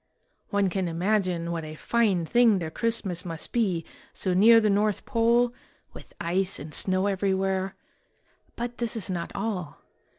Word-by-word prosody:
One 200 -1 +2
can 185 0 -1
imagine 175 -1 0
what 165 -1 -3
a 155 0 -7
fine 200 -2 +1
thing 235 +2 +4
their 165 -3 -4
Christmas 200 -5 -1
must 165 -2 -5
be, 190 -9 0 0.3
so 185 - -1
near 225 +5 +7
the 215 - +2
North 205 0 +1
Pole, 235 0 +2 0.4
with - - -13
ice 185 +3 0
and 150 +1 -9
snow 185 +3 0
every 195 -1 +1
where; 190 0 -1 0.8
but 240 0 -5
this 235 -1 -2
is 205 -4 -3
not 170 -2 -3
all. 195 -7 -3
195 Hz, 160 wpm, -26 LUFS, 175-225 Hz, 0.8 s, near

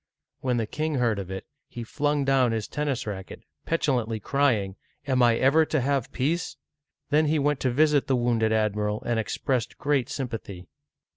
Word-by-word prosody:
When 125 -2 0
the 115 - 0
king 155 +6 -2
heard 120 -5 +1
of 95 -2 -6
it, 95 0 -6 0.2
he 120 - -7
flung 145 +4 0
down 130 -3 +3
his 110 -2 -2
ten 150 0 -3
nis 135 -3 -1
racket, 95 -3 -7 0.2
petulantly 125 -9 0
crying, 115 -7 +1 0.3
"Am 130 -2 +1
I 120 -1 +5
never 140 +5 +4
to 155 - 0
have 135 -1 0
peace?" 160 +7 -1 0.5
Then 155 +1 +4
he 155 +1 +2
went 145 -1 +1
to 130 - +1
visit 150 +2 +3
the 135 - +2
wounded 120 -2 +1
admiral, 105 -1 0
and 120 -1 0
expressed 120 +2 -2
great 140 -3 0
sympathy. 115 -9 -5
125 Hz, 175 wpm, -26 LUFS, 110-145 Hz, 0.5 s, I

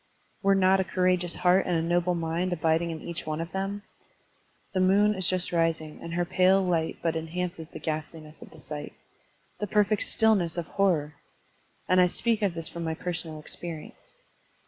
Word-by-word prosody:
Were 195 0 +4
not 190 0 +4
a - - +2
courageous 180 -1 +1
heart 180 +1 +3
and 180 - +1
a - - +1
noble 175 +1 +1
mind 170 +2 -1
abiding 165 +1 +1
in 160 -2 -5
each 170 -2 -4
one 155 0 -2
of 165 +1 -5
them? 195 +1 -3 0.9
The 190 - 0
moon 200 +3 +4
is 190 -3 +2
just 185 -1 0
rising, 165 -2 0
and 170 0 -6
her 175 0 +1
pale 185 +2 +4
light 165 -3 0
but 165 -1 0
enhances 165 0 -4
the - - -9
ghast 155 +1 -4
liness 155 -1 -13
of - - -11
the 160 - -15
sight. 150 0 -7 0.7
The 210 - -2
perfect 210 +1 +2
stillness 200 -7 +3
of 170 - -2
hor 195 +1 +2
ror! 150 0 -7 0.7
And 185 0 +5
I 180 - +5
speak 225 +4 0
of 195 -5 0
this 165 -1 -2
from 170 - -4
my 160 -1 -2
personal 165 -2 -4
experience. 160 +1 -8
175 Hz, 190 wpm, -27 LUFS, 160-185 Hz, 0.9 s, And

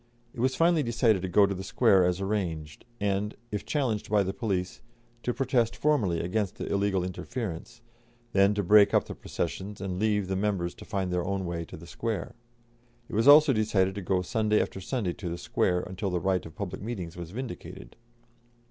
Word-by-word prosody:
It 125 - -10
was 130 +2 +1
finally 165 -1 +3
decided 115 -5 +2
to 95 - -2
go 100 +3 +5
to 100 - -1
the 95 0 -6
Square 95 -1 +4
as 90 +1 0
arranged, 85 -7 -3
and, 100 +1 -1 0.2
if 105 - -4
challenged 125 -8 -1
by 105 -1 +3
the 95 0 -3
police, 95 -6 -2 0.4
to 125 - -1
protest 120 -3 +1
formally 105 - +1
against 95 +2 -1
the - - -5
illegal 100 -2 +1
interference, 110 +3 -5 0.5
then 100 +1 +4
to 100 - 0
break 105 +2 +6
up - - +3
the - - -6
processions 95 +4 -4
and 95 -1 -4
leave 105 -2 +1
the 95 - -1
members 95 -3 -1
to - - -12
find 95 -4 -2
their 90 -1 0
own 95 0 -2
way 85 -1 -3
to - - -10
the 80 - -12
Square. 105 +1 -4 0.8
It - - -11
was 115 +5 +2
also 150 0 +8
decided 105 -4 +2
to 100 - -5
go 90 0 0
Sunday 105 +2 +1
after 95 - -2
Sunday 100 -3 -2
to 90 - -6
the 85 - -4
Square, 90 +1 0
until 95 +2 -4
the 90 -1 -1
right 95 0 0
of 80 - -14
public 100 -4 -5
meetings 95 -7 -5
was 85 -2 -7
vindicated. 100 - -8
100 Hz, 200 wpm, -28 LUFS, 90-110 Hz, 0.8 s, also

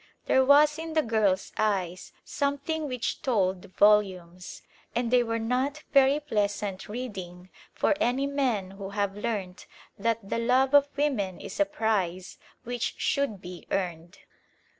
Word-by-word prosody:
There 265 - +4
was 295 +3 +5
in 325 0 -5
the 315 -1 +3
girl's 210 -5 +1
eyes 190 -4 -1
something 285 +2 -2
which 250 -3 -3
told 190 -7 0
volumes, 185 -4 +2 0.3
and 240 0 0
they 250 -1 +5
were 230 -1 -1
not 255 +6 -1
very 275 +1 +5
pleasant 205 -8 -2
reading 185 -6 -7 0.2
for - - +1
any 270 -1 +1
men 255 -9 -1
who 195 0 -7
have 200 -1 -2
learnt 205 -4 -4 0.3
that 225 -1 -1
the 230 - -1
love 255 +3 +2
of 285 0 +6
women 230 -11 0
is 200 +2 -8
a 300 - +5
prize 210 - -2 0.2
which 245 -1 -3
should 250 -9 -1
be 180 -1 -9
earned. 175 -2 -3
225 Hz, 140 wpm, -27 LUFS, 195-270 Hz, 0.3 s, of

